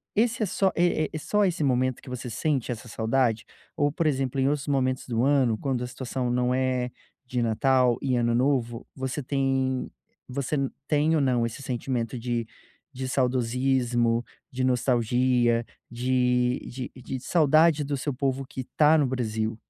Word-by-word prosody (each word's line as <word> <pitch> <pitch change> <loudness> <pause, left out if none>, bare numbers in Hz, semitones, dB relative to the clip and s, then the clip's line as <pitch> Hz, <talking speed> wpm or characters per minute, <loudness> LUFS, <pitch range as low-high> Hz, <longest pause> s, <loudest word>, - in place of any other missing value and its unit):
esse 225 +1 +2
é - - +2
só 190 0 +1
é 170 -3 +2
é - - -2
só 210 +6 +1
esse 180 -4 0
momento 130 -2 +1
que - - -12
você 125 -1 -5
sente 130 +3 -1
essa 120 +1 -6
saudade? 115 0 0 0.3
Ou 145 -1 +3
por 160 +2 -2
exemplo, 135 -2 0
em 135 - +3
outros 145 -1 -2
momentos 130 -2 0
do 120 -1 0
ano, 130 -5 +3
quando 130 0 -2
a - - -3
situação 125 0 -3
não 125 +1 +1
é 130 -1 0 0.3
de 125 -1 -2
Natal 120 +2 +2
e 130 -2 0
Ano 120 0 +1
Novo 120 -2 0
você 130 +2 -3
tem 135 -1 0 0.4
você 140 +3 -2 0.3
tem 155 +2 +2
ou 150 - +2
não 125 -3 +2
esse 115 +4 -6
sentimento 125 -2 -3
de 120 -1 -2 0.5
de 130 0 -4
saudosismo, 125 -2 +1 0.3
de 130 +1 -2
nostalgia, 120 -1 +2 0.2
de 125 0 +1
de 125 0 -6
de 130 +1 -5
saudade 155 0 +4
do 140 0 -2
seu 145 +1 -2
povo 135 0 -1
que 130 -1 -7
tá 155 +1 +6
no 145 -3 +2
Brasil? 110 -3 -2
130 Hz, 170 wpm, -26 LUFS, 120-140 Hz, 0.5 s, tá